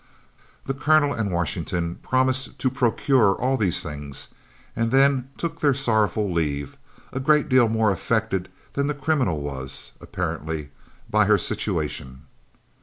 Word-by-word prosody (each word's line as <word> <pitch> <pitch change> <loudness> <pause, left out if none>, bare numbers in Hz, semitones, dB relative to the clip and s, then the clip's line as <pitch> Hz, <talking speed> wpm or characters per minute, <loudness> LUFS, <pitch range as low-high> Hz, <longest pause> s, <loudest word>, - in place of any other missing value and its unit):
The 135 - -1
Colonel 145 +1 +3
and 110 -6 -2
Washington 85 0 -2
promised 130 0 +1
to 130 - 0
procure 125 -4 +3
all 130 +2 0
these 95 -7 +1
things, 75 -3 -5 0.5
and 115 0 0
then 135 0 +3
took 165 -1 -4
their 145 -3 +3
sorrowful 110 -6 +1
leave, 70 -4 -2 0.4
a 130 - -2
great 150 +2 +3
deal 130 -3 +4
more 110 -1 +2
affected 95 -1 -1 0.2
than 140 0 0
the 150 - -1
criminal 135 - 0
was, 65 -3 -4
apparently, 80 -4 -4 0.4
by - - +3
her - - +5
situation. 65 +1 -3
110 Hz, 135 wpm, -24 LUFS, 85-135 Hz, 0.5 s, her